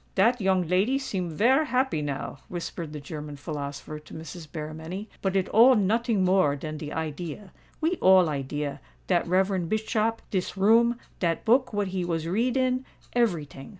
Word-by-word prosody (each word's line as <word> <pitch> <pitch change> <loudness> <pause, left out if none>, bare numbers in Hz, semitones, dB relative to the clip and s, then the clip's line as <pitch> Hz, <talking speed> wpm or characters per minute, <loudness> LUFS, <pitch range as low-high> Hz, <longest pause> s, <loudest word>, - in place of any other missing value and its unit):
"Dat 230 +5 +3
young 190 -3 +2
lady 195 +10 +2
seem 195 -10 -3
vare 245 - +3
happy 255 - 0
now," 140 -1 -4
whispered 170 -2 -5
the 150 - -6
German 150 0 -7
philosopher 145 0 -6
to 150 - -13
Mrs. 160 +1 -8
Berrymenny; 160 +6 -6
"but 195 -1 -1
it 190 -1 +2
all 245 +4 +7
noting 220 0 +2
more 185 -6 +3
dan 155 +2 -6
de 150 0 -6
idea. 160 +4 -5 0.3
We 335 +3 +1
all 185 -2 +6
idea—dat 135 - -3
reverend 185 -1 +1
Bischop—dis 215 -3 -1
room—dat 225 -4 +2
book 250 +3 +3
what 205 -2 -1
he 185 -1 -2
was 165 -2 -2
read 235 +8 +1
in—every 245 - 0
ting!" 135 -1 -11
185 Hz, 150 wpm, -27 LUFS, 155-225 Hz, 0.3 s, all